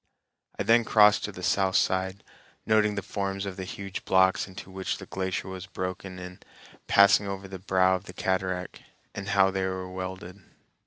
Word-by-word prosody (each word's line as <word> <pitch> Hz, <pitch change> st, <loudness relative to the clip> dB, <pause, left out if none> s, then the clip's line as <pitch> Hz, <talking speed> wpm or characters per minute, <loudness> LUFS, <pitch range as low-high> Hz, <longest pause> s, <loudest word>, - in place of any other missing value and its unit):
I -, -, -1 dB
then 115 Hz, +3 st, +5 dB
crossed 105 Hz, -2 st, +5 dB
to -, -, -5 dB
the -, -, -10 dB
south 95 Hz, -1 st, +1 dB
side, 95 Hz, +1 st, +1 dB, 0.4 s
noting 105 Hz, -1 st, +3 dB
the 100 Hz, -, -3 dB
forms 95 Hz, 0 st, -3 dB
of 95 Hz, -2 st, -5 dB
the 95 Hz, -1 st, -6 dB
huge 95 Hz, 0 st, -6 dB
blocks 95 Hz, 0 st, +3 dB
into 95 Hz, 0 st, -10 dB
which 95 Hz, 0 st, -3 dB
the -, -, -9 dB
glacier 95 Hz, -1 st, -3 dB
was 95 Hz, 0 st, -7 dB
broken 95 Hz, 0 st, -5 dB
in 90 Hz, 0 st, -9 dB, 0.5 s
passing 100 Hz, 0 st, +5 dB
over 95 Hz, 0 st, -5 dB
the 95 Hz, -1 st, -8 dB
brow 95 Hz, 0 st, +3 dB
of 90 Hz, -, -15 dB
the 90 Hz, -, -10 dB
cataract, 95 Hz, -1 st, -2 dB, 0.3 s
and 100 Hz, 0 st, -6 dB
how 95 Hz, -1 st, +4 dB
they 95 Hz, 0 st, -1 dB
were 95 Hz, 0 st, -4 dB
welded. 95 Hz, +1 st, -7 dB
95 Hz, 180 wpm, -27 LUFS, 95-100 Hz, 0.5 s, then